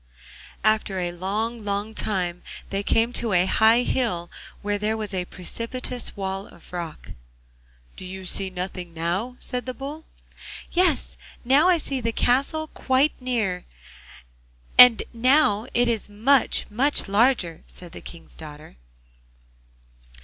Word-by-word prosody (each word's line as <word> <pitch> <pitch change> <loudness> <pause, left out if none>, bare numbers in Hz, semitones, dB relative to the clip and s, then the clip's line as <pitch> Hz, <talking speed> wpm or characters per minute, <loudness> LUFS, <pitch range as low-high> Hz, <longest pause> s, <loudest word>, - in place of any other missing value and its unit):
After 215 -2 +2
a 175 -1 -1
long, 210 +6 -3
long 205 +2 -3
time 180 -5 -1 0.3
they 195 - 0
came 225 +4 +1
to 230 -5 +1
a 180 0 +4
high 225 +5 +4
hill, 180 -11 -1 0.3
where 205 0 -1
there 215 +2 0
was 215 -2 -5
a 180 -1 -1
precipitous 230 +8 -5
wall 195 0 -4
of 170 - -18
rock. 170 -3 -6 0.9
'Do - - -8
you 190 0 -8
see 190 +1 -1
nothing 180 -2 -6
now?' 180 +10 -2
said 250 0 -5
the 255 - -4
Bull. 290 +4 -7 0.7
'Yes, 350 -6 +2 0.3
now 285 +8 +5
I 360 - +5
see 275 -4 -3
the 230 0 -1
castle 275 +7 +1
quite 265 +3 +2
near, 225 -8 -2 1.1
and 250 -2 +9
now 240 -3 +3
it 245 0 +2
is 225 -3 -1
much, 240 +6 +3
much 270 +5 +2
larger,' 200 -5 +2
said 175 -2 -12
the - - -9
King's 170 - -11
daughter. 150 - -11
215 Hz, 135 wpm, -24 LUFS, 185-250 Hz, 1.1 s, and